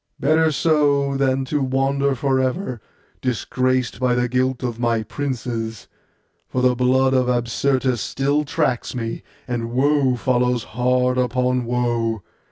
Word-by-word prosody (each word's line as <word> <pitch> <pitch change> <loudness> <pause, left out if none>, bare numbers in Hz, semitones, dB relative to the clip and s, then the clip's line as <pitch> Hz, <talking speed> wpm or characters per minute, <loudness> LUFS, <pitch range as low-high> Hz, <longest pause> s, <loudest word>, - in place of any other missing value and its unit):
Better 155 +3 +3
so, 145 -3 +2
than 135 -1 +1
to 145 +2 -1
wander 135 +1 +1
for 135 +1 +1
ever, 130 - -2 0.4
disgraced 130 0 -1
by 125 -1 +2
the 125 0 +1
guilt 130 +1 0
of 120 -2 -3
my 115 -2 +1
princes; 115 -4 -4 0.6
for 125 - -2
the 125 0 +4
blood 130 +2 +2
of 130 -1 +2
Absyrtus 125 +1 0
still 140 +2 0
tracks 145 -6 -1
me, 115 -2 -4 0.3
and 120 -2 -3
woe 135 0 +2
follows 125 -1 +1
hard 125 +1 +1
upon 125 0 0
woe. 115 -3 -1
125 Hz, 135 wpm, -21 LUFS, 120-135 Hz, 0.6 s, the